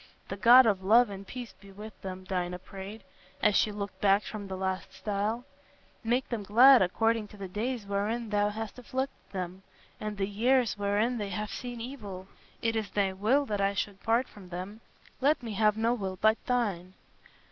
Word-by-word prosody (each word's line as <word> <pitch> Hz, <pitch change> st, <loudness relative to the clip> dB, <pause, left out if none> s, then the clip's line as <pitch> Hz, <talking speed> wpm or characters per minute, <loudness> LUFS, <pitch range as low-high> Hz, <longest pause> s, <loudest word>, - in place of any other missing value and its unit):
"The 195 Hz, -, -3 dB
God 240 Hz, +5 st, +8 dB
of 200 Hz, -4 st, +1 dB
love 225 Hz, +3 st, +5 dB
and 195 Hz, 0 st, -8 dB
peace 245 Hz, -5 st, -7 dB
be 200 Hz, 0 st, -16 dB
with 210 Hz, +2 st, -11 dB
them," 185 Hz, -1 st, -6 dB
Dinah 180 Hz, -1 st, -2 dB
prayed, 195 Hz, +3 st, -9 dB, 0.4 s
as 210 Hz, -1 st, +3 dB
she 215 Hz, -, +3 dB
looked 205 Hz, -1 st, -6 dB
back 200 Hz, 0 st, +4 dB
from 205 Hz, -2 st, -6 dB
the 190 Hz, -1 st, -5 dB
last 190 Hz, 0 st, -3 dB
stile. 210 Hz, +5 st, -2 dB, 0.6 s
"Make 245 Hz, +3 st, +1 dB
them 235 Hz, -3 st, -2 dB
glad 245 Hz, +6 st, +7 dB
according 225 Hz, +4 st, +1 dB
to 210 Hz, -, -14 dB
the 195 Hz, -1 st, -6 dB
days 220 Hz, +4 st, -3 dB
wherein 210 Hz, +3 st, -2 dB
thou 205 Hz, 0 st, +2 dB
hast 220 Hz, +3 st, -6 dB
afflicted 260 Hz, +2 st, -5 dB
them, 185 Hz, -1 st, -5 dB, 0.4 s
and 215 Hz, -1 st, -4 dB
the 195 Hz, -, 0 dB
years 240 Hz, +4 st, +2 dB
wherein 205 Hz, +4 st, 0 dB
they 205 Hz, -1 st, -3 dB
have 210 Hz, +2 st, -4 dB
seen 245 Hz, -1 st, -6 dB
evil. 210 Hz, -7 st, -7 dB, 0.4 s
It 225 Hz, 0 st, +1 dB
is 215 Hz, -2 st, -2 dB
thy 195 Hz, -2 st, 0 dB
will 230 Hz, +9 st, +2 dB
that 205 Hz, -5 st, -2 dB
I 200 Hz, 0 st, +1 dB
should 195 Hz, 0 st, -3 dB
part 230 Hz, +3 st, +2 dB
from 190 Hz, -3 st, -14 dB
them; 185 Hz, +5 st, -7 dB, 0.4 s
let 285 Hz, 0 st, +3 dB
me 225 Hz, -2 st, -4 dB
have 210 Hz, +1 st, +3 dB
no 230 Hz, +2 st, +2 dB
will 195 Hz, -5 st, -3 dB
but 220 Hz, +1 st, +3 dB
thine." 200 Hz, -8 st, -1 dB
210 Hz, 190 wpm, -29 LUFS, 195-230 Hz, 0.6 s, God